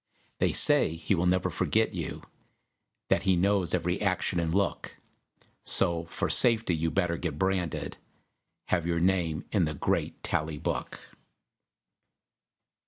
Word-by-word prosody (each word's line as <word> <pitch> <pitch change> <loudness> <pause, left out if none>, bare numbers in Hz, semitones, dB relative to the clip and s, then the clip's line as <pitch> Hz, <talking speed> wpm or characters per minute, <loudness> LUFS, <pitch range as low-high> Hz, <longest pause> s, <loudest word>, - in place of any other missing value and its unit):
They - - +2
say 80 - +4
he 85 - -1
will 90 -1 +1
never 90 0 +1
forget - - 0
you, - - -5 0.9
That - - +2
he 95 - +2
knows 95 0 +1
every 90 +2 -2
action 95 -2 0
and 80 -1 -1
look; 100 +3 -2 0.6
So, 85 -3 +2
for - - -3
safety, 115 -7 +3
you'd 80 +1 -2
better 90 -3 0
get 80 -4 -4
branded, 95 -3 -2 0.7
Have 85 -2 0
your 85 -1 0
name 85 -3 0
in 95 -5 +2
the 75 -1 -4
great - - -2
Tally 75 0 -2
Book. - - -4
90 Hz, 135 wpm, -28 LUFS, 85-95 Hz, 0.9 s, say